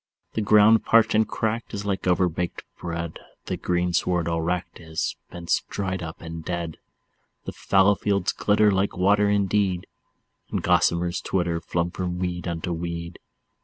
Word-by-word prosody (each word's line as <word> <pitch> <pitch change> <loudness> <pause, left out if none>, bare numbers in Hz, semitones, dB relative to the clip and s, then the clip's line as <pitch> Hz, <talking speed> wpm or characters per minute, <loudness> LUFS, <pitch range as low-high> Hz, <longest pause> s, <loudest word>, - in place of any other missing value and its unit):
The 110 - -1
ground 105 +1 +6
parched 115 0 +4
and 110 0 +3
cracked 110 0 -2
is 100 0 -5
like 95 -2 -2
overbaked 90 -1 0 0.2
bread, 85 -1 -4 0.3
The - - -2
greensward 90 -1 0
all 85 -1 0
wracked 90 +2 -3
is, 80 -2 -3
bents 85 -1 -1
dried 95 -2 -3
up 80 -1 -7
and 80 0 -7
dead. 85 -2 -4 0.7
The - - -4
fallow 95 +1 +3
fields 100 -2 0
glitter 105 0 +3
like 95 0 0
water 100 +2 +3
indeed, 100 -2 +1 0.6
And - - -2
gossamers 85 +1 +2
twitter, 85 -3 -1
flung 85 +1 -1
from 90 -1 -3
weed 90 -1 -3
unto 85 +1 -3
weed. 85 0 -5
90 Hz, 150 wpm, -25 LUFS, 85-100 Hz, 0.7 s, ground